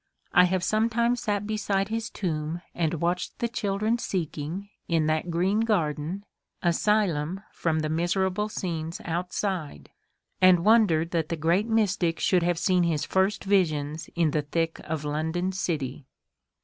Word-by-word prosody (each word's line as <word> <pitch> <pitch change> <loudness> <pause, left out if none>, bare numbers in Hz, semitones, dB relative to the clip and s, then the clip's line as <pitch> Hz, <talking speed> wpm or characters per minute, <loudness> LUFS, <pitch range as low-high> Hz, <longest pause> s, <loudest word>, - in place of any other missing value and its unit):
I 180 0 +7
have 185 0 0
sometimes 230 +4 +1
sat 205 -1 -1
beside 205 -2 -1
his 225 0 -2
tomb 165 -2 -3
and 170 -1 0
watched 175 +3 -2
the 235 - 0
children 215 +1 -1
seeking 175 0 -3 0.2
in 165 -2 +2
that 155 +2 0
green 185 +5 +1
garden 180 -3 -1 0.4
asylum 180 -2 +1
from 160 -2 0
the 155 - -1
miserable 185 +5 0
scenes 165 -5 -4
outside, 175 - -3 0.5
and 185 -2 +6
wondered 190 -7 +4
that 165 -2 -1
the 165 - -1
great 170 +7 +2
mystic 195 -7 +1
should 180 -2 +3
have 175 0 +1
seen 180 +1 +2
his 160 -4 +1
first 190 +2 +1
visions 160 -6 0
in 165 -3 +2
the 150 - +1
thick 165 +3 -2
of 155 -2 -3
London 160 +5 -1
city. 145 -7 -3
175 Hz, 145 wpm, -26 LUFS, 160-200 Hz, 0.5 s, I